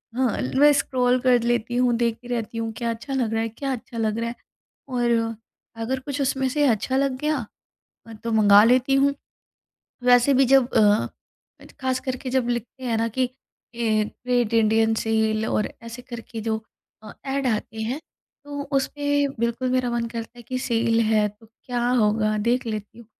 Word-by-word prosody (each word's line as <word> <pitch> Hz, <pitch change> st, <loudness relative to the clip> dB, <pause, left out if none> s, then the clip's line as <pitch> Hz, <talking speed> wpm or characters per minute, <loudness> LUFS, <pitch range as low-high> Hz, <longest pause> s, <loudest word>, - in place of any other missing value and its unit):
हाँ, 255 Hz, -3 st, +1 dB, 0.2 s
मैं 295 Hz, +2 st, +7 dB
स्क्रॉल 255 Hz, -2 st, +1 dB
कर 250 Hz, -2 st, +4 dB
लेती 240 Hz, 0 st, 0 dB
हूँ 250 Hz, -1 st, +3 dB
देखती 235 Hz, 0 st, -1 dB
रहती 230 Hz, -2 st, -3 dB
हूँ 225 Hz, 0 st, -2 dB
क्या 235 Hz, -2 st, -2 dB
अच्छा 235 Hz, +5 st, -6 dB
लग 245 Hz, -4 st, 0 dB
रहा 225 Hz, -, +1 dB
है? 225 Hz, -, -2 dB
क्या 270 Hz, +5 st, -4 dB
अच्छा 240 Hz, 0 st, -8 dB
लग 220 Hz, -1 st, 0 dB
रहा 230 Hz, 0 st, -1 dB
है? 240 Hz, -, -7 dB, 0.5 s
और 245 Hz, -2 st, 0 dB, 0.7 s
अगर 260 Hz, +3 st, -2 dB
कुछ 280 Hz, +2 st, -5 dB
उसमें 265 Hz, 0 st, 0 dB
से 290 Hz, +2 st, +1 dB
अच्छा 240 Hz, +3 st, 0 dB
लग 270 Hz, -1 st, +1 dB
गया 305 Hz, 0 st, +1 dB, 0.7 s
अ, 225 Hz, -, -9 dB
तो 230 Hz, +1 st, -5 dB
मँगा 205 Hz, -1 st, +7 dB
लेती 255 Hz, +2 st, +3 dB
हूँ। 280 Hz, +1 st, +3 dB, 0.9 s
वैसे 245 Hz, +2 st, +5 dB
भी 270 Hz, +1 st, +5 dB
जब 265 Hz, -2 st, +6 dB
अ, 210 Hz, -1 st, +4 dB, 0.7 s
खास 260 Hz, -1 st, 0 dB
करके 255 Hz, 0 st, -4 dB
जब 245 Hz, -2 st, +1 dB
लिखते 240 Hz, +2 st, -4 dB
हैं 235 Hz, -2 st, 0 dB
ना 230 Hz, -, +1 dB
कि 255 Hz, -1 st, +2 dB, 0.5 s
ए, 220 Hz, -2 st, +1 dB
ग्रेट 245 Hz, 0 st, -1 dB
इंडियन 225 Hz, 0 st, +3 dB
सेल 220 Hz, 0 st, +1 dB
और 210 Hz, -, 0 dB
ऐसे 230 Hz, +1 st, -8 dB
करके 235 Hz, -1 st, -8 dB
जो 220 Hz, 0 st, -1 dB, 0.4 s
अ, 215 Hz, -, -10 dB
एड 270 Hz, 0 st, -1 dB
आते 220 Hz, -1 st, -2 dB
हैं, 250 Hz, +7 st, -3 dB, 0.4 s
तो 285 Hz, 0 st, -5 dB
उसमें 285 Hz, +1 st, +1 dB
बिल्कुल 235 Hz, +2 st, 0 dB
मेरा 255 Hz, -1 st, +1 dB
मन 235 Hz, -1 st, -1 dB
करता 230 Hz, +1 st, -7 dB
है 240 Hz, -, -10 dB
कि 255 Hz, +3 st, -4 dB
सेल 230 Hz, -2 st, +1 dB
है 215 Hz, -1 st, +3 dB
तो 210 Hz, +2 st, -18 dB
क्या 240 Hz, +2 st, -3 dB
होगा 215 Hz, 0 st, +2 dB
देख 250 Hz, +1 st, +1 dB
लेती 215 Hz, +1 st, -5 dB
हूँ। 235 Hz, -, -13 dB
240 Hz, 185 wpm, -24 LUFS, 225-260 Hz, 0.9 s, मैं